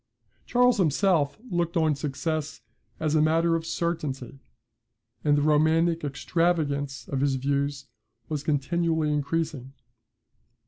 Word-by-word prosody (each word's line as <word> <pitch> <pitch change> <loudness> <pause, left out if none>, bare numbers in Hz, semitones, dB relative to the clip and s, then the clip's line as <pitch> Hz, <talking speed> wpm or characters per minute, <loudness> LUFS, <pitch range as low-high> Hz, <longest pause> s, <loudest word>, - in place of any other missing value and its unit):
] 105 - -41
Charles 250 0 +4
himself 165 -3 +2
looked 175 -1 0
on 160 -2 +3
success 150 +1 -3 0.4
as 155 -1 0
a 155 - +4
matter 165 +2 +3
of 165 0 -3
certainty; 145 -7 -3 0.8
and 145 -1 +3
the 145 - +1
romantic 160 +2 +3
extravagance 145 -2 -1
of 135 -1 -2
his 140 -1 +2
views 140 +1 -1 0.4
was 150 0 -3
continually 155 +1 0
increasing. 145 -2 -2
155 Hz, 120 wpm, -26 LUFS, 140-165 Hz, 0.8 s, Charles